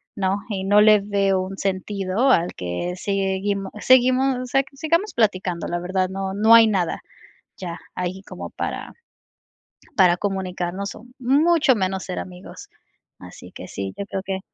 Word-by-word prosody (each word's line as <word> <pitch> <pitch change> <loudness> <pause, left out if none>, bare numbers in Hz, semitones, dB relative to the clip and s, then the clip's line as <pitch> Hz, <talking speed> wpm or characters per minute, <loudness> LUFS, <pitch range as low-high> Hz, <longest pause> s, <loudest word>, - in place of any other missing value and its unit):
¿no? 195 0 0
Y 195 -2 -3
no 205 +1 +5
le 215 -1 +6
veo 195 -2 +1
un 190 +1 -6
sentido 195 +4 -1
al 175 -3 +2
que 90 - -3
seguimos 195 0 -1
seguimos 255 +1 +4
o 255 - -4
sea, 270 +2 +2
sigamos 335 +8 0
platicando, 185 -6 0
la 175 - -2
verdad, 185 +1 -1
no 190 0 -4
no 220 +3 +6
hay 230 -1 +8
nada 185 -6 -1 0.6
ya 175 -3 -5 0.2
ahí 180 +2 -3
como - - -8
para - - -5 1.1
para 180 -2 +5
comunicarnos 190 0 -3
o 225 - -13
mucho 295 +3 +4
menos 190 -2 -1
ser 180 - -4
amigos. 180 -1 -10 0.5
Así - - -12
que - - -9
sí, 95 -1 -5
yo 200 - -4
creo 190 - -3
que. 190 -1 -3
195 Hz, 155 wpm, -22 LUFS, 185-220 Hz, 1.1 s, hay